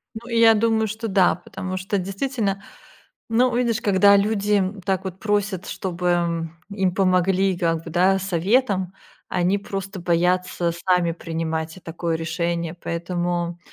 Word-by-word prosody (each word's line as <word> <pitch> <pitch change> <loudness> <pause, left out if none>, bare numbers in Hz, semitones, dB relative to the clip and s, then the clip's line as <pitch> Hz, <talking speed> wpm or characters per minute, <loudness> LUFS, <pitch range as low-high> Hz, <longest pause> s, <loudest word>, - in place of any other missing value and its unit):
Ну 235 +2 -8
и 230 -1 0
я 225 -1 +7
думаю, 220 0 +2
что 220 +2 -4
да. 190 -2 +4
Потому 185 +1 -6
что, 190 +2 -2
действительно, 195 +1 -2 0.7
ну, 245 +2 +2
видишь, 240 -2 +1
когда 200 -2 +5
люди 205 0 +2 0.2
так 190 0 0
вот 190 -1 -6
просят, 205 -3 -1
чтобы, 180 -1 -3
м, 170 -2 0
им 190 -3 0
помогли 190 0 +2
и - - -9
как 165 -1 0
бы, 165 - -7
да, 185 +3 +3
советом, 190 +1 +1 0.4
они 180 +2 +1
просто 195 -1 -6
боятся 175 0 +1
сами 175 0 +1
принимать 160 -1 -4
и - - -12
такое 165 0 -3
решение. 170 +1 -2
Поэтому 175 0 -3
185 Hz, 150 wpm, -23 LUFS, 170-200 Hz, 0.7 s, я